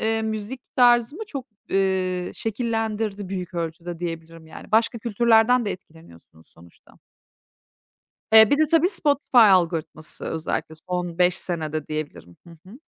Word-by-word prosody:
eee, 225 0 0
müzik 220 +3 -4 0.2
tarzımı 245 - +3
çok, 275 -9 -7 0.2
eee, 185 -2 0
şekillendirdi 220 -3 -3
büyük 185 -1 -6
ölçüde 170 0 -5
diyebilirim, 165 -1 -7
yani. 160 - -13
Başka 225 +1 +2
kültürlerden 235 +2 +3
de 205 - -2
etkileniyorsunuz 160 - -16
sonuçta. 85 0 -21 1.4
Bir 220 +5 +7
de 310 0 +3
tabii, 330 +2 +4
Spotify 285 -8 +1
algoritması 170 -7 +2
özellikle 160 0 -4
son 175 -2 -3
5 180 0 +3
senede, 155 -3 -3
diyebilirim. 155 - -7
Hı 165 -1 -14
hı. 235 +7 -13
195 Hz, 125 wpm, -23 LUFS, 165-230 Hz, 1.4 s, Bir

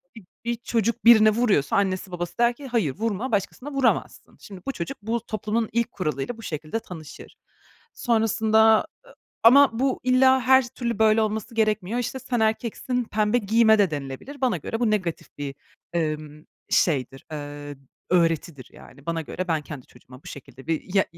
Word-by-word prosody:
bir 220 - -12 0.2
bir 235 0 0
çocuk 230 0 -2
birine 220 -2 +8
vuruyorsa 215 - +1
annesi 190 -1 0
babası 175 -1 -5
der 240 0 +3
ki 275 +2 -10
"Hayır, 215 - 0
vurma 225 +3 -2
başkasına 220 +8 -2
vuramazsın." 275 -2 -1
Şimdi, 190 -3 -11
bu - - +1
çocuk 170 -8 -6
bu 225 +2 -2
toplumun 220 0 -2
ilk 235 0 0
kuralıyla 155 - -3
bu - - -11
şekilde 155 +6 -4
tanışır. 165 -8 -11 0.6
Sonrasında, 220 -1 +3 0.3
ı - - -17 0.3
ama 250 0 +6
bu 265 0 0
illa 260 +1 +4
her 260 0 +4
türlü 235 -3 -4
böyle 220 0 +4
olması 220 +2 -3
gerekmiyor, 215 0 0
işte, 245 +2 -3
"Sen 250 -2 -2
erkeksin, 235 +3 -1
pembe 215 +2 +1
giyme." 220 0 +4
de 195 -5 +3
denilebilir. 145 - -7
Bana 255 -3 +1
göre 225 - -5
bu 230 -3 +2
negatif 185 -6 -2
bir, 140 -1 -5 0.4
ımm, 155 -2 -3 0.2
şeydir, 135 -5 0
ııı, 145 -1 -7 0.3
öğretidir 165 -5 0
yani. 140 +4 -16
Bana 165 -1 -1
göre 180 +4 -5
ben 160 -2 0
kendi 145 -4 -9
çocuğuma 125 +2 -17
bu - - -17
şekilde 135 -1 -11
bir 165 +3 -3
ya 195 - +4
215 Hz, 165 wpm, -24 LUFS, 165-235 Hz, 0.6 s, birine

